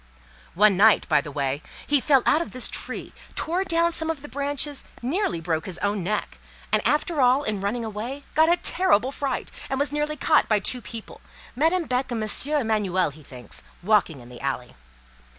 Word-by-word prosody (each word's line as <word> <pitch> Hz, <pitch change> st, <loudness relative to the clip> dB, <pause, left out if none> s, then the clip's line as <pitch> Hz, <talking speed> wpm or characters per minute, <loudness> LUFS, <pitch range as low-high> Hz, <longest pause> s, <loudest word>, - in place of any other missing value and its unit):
One 205 Hz, +1 st, +5 dB
night, 215 Hz, +2 st, +5 dB
by 155 Hz, -3 st, +3 dB
the 150 Hz, -, -8 dB
way, 140 Hz, 0 st, -2 dB, 0.2 s
he 290 Hz, -1 st, +3 dB
fell 270 Hz, -2 st, +4 dB
out 310 Hz, -, +4 dB
of 340 Hz, -, -6 dB
this 255 Hz, -1 st, 0 dB
tree, -, -, -5 dB, 0.2 s
tore 350 Hz, +4 st, 0 dB
down 340 Hz, -2 st, +1 dB
some 320 Hz, -1 st, 0 dB
of 310 Hz, -3 st, -3 dB
the -, -, -7 dB
branches, 285 Hz, 0 st, -2 dB, 0.2 s
nearly 260 Hz, -, 0 dB
broke 165 Hz, +2 st, -2 dB
his 180 Hz, -2 st, -5 dB
own 205 Hz, -1 st, -1 dB
neck, 210 Hz, +4 st, -3 dB, 0.3 s
and -, -, +4 dB
after 300 Hz, 0 st, +1 dB
all, 255 Hz, +3 st, +4 dB
in 210 Hz, -6 st, -2 dB
running 225 Hz, +4 st, -2 dB
away, 230 Hz, +7 st, -5 dB
got 320 Hz, +2 st, +5 dB
a 350 Hz, -, +4 dB
terrible 330 Hz, -, +2 dB
fright, 275 Hz, -2 st, -3 dB, 0.2 s
and 270 Hz, -, -1 dB
was 285 Hz, 0 st, +1 dB
nearly 295 Hz, +1 st, -1 dB
caught 305 Hz, +2 st, +3 dB
by 215 Hz, -, +4 dB
two 250 Hz, +5 st, +1 dB
people, 225 Hz, -1 st, -9 dB, 0.3 s
Madame 325 Hz, +7 st, +2 dB
Beck 255 Hz, -1 st, -1 dB
and 225 Hz, -2 st, -1 dB
M. 285 Hz, +7 st, +1 dB
Emanuel, 200 Hz, -, +1 dB
he 155 Hz, +2 st, -15 dB
thinks, 125 Hz, -5 st, -7 dB, 0.2 s
walking 185 Hz, -, +2 dB
in 120 Hz, -, -14 dB
the 125 Hz, -, -11 dB
alley. 130 Hz, -3 st, -3 dB
245 Hz, 195 wpm, -24 LUFS, 195-295 Hz, 0.3 s, One